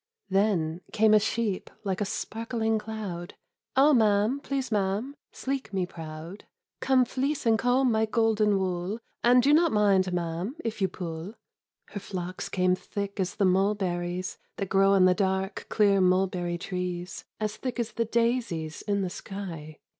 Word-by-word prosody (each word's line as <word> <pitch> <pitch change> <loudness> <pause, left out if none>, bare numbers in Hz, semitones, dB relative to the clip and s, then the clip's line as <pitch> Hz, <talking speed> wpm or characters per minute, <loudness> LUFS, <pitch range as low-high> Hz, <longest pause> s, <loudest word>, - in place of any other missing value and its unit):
Then 185 -5 +1
came 220 0 +4
a 215 - +7
sheep 215 -2 -1
like 195 -1 -2
a - - +1
sparkling 225 +1 -2
cloud; 210 -6 -6 0.4
"Oh, 285 +3 +6
ma'am, 215 +2 +3
please, 275 -3 -3
ma'am, 210 +6 -1 0.2
sleek 270 -3 -4
me 190 -2 0
proud, 165 +2 -9 0.3
Come 260 -1 +3
fleece 270 +3 -2
and 225 -1 +4
comb 250 +1 +3
my 220 0 +2
golden 215 -2 +2
wool, 185 +2 -2 0.3
And 245 +1 +6
do 285 +3 +5
not 330 +1 +5
mind, 195 -3 +3
ma'am, 175 - -2
if 220 -2 -3
you 190 - +4
pull! 175 +2 -6 0.3
" - - -60
Her 205 - -4
flocks 185 -2 -5
came 185 -1 +2
thick 200 +2 -4
as 185 -1 -1
the 200 - +2
mulberries 185 -2 0 0.2
That 195 -2 -4
grow 195 0 +4
on 190 -2 +5
the 185 - +6
dark, 190 0 -1
clear 200 -2 +3
mulberry 180 -1 +1
trees. 180 0 -4 0.2
As 215 0 -2
thick 255 0 -4
as 235 -1 -1
the 230 - -1
daisies 230 -9 -1
in 200 -2 0
the 185 - -2
sky 165 -7 -7
200 Hz, 160 wpm, -27 LUFS, 180-225 Hz, 0.4 s, a